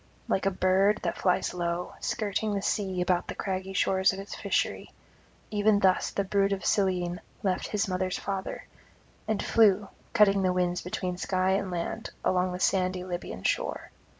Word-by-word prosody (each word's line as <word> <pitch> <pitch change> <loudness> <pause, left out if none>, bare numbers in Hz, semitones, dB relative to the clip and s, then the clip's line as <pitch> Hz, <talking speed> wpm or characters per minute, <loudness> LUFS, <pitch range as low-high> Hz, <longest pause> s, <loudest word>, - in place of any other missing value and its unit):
Like 190 - +1
a - - +5
bird 190 +2 +2
that - - -2
flies 180 -2 +1
low, 175 0 -2
skirting 210 -1 -1
the 200 - -1
sea 190 -4 -1
about 180 0 +1
the - - -5
craggy 190 0 -3
shores 190 0 +3
of 190 - -6
its 195 - -7
fishery, - - -1 0.6
even 210 0 +3
thus 190 -2 +3
the 200 - -1
brood 195 0 +1
of 195 - -4
Cyllene 180 -3 +1 0.2
left 185 -2 0
his 210 -1 0
mother's 185 0 -1
father, 195 -1 -4 0.6
and 215 -1 0
flew, 205 -3 +4 0.2
cutting 200 -3 +5
the 185 -1 +2
winds 180 -1 0
between 180 0 -3
sky 185 0 +1
and 195 0 0
land, 180 +5 -3 0.2
along 180 0 +2
the 180 - -5
sandy 185 -1 +1
Libyan 175 - -5
shore. - - -1
190 Hz, 170 wpm, -28 LUFS, 180-200 Hz, 0.6 s, a